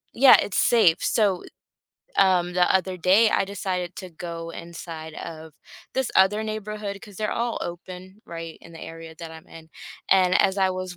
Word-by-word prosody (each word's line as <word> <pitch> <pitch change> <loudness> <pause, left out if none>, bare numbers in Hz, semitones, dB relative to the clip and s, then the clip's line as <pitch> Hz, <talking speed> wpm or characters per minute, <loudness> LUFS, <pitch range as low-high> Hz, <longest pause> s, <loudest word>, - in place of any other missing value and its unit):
Yeah, 260 +2 +8
It's 200 - -1
safe. 215 -9 +4
So, 200 -5 +1 0.8
um, 180 -2 +3
the 180 -1 +3
other 185 0 +1
day, 195 +6 +4
I 195 - +2
decided 185 -3 -4
to 185 - -7
go 165 0 -7
inside 165 -2 -8
of 160 -2 -9 0.4
this 265 -1 -1
other 210 +3 +4
neighborhood 210 -2 -5
'cause 205 -3 -12
they're 215 -1 -2
all 235 0 -2
open 185 +4 -8
right 165 -1 -8
in 165 - -15
the 165 - -11
area 165 0 -9
that 165 -1 -8
I'm 160 0 -13
in. 160 -1 -13 0.4
And 185 -1 +4
as 190 +1 +2
I 190 -1 +2
was 185 -1 -5
185 Hz, 175 wpm, -24 LUFS, 165-200 Hz, 0.8 s, Yeah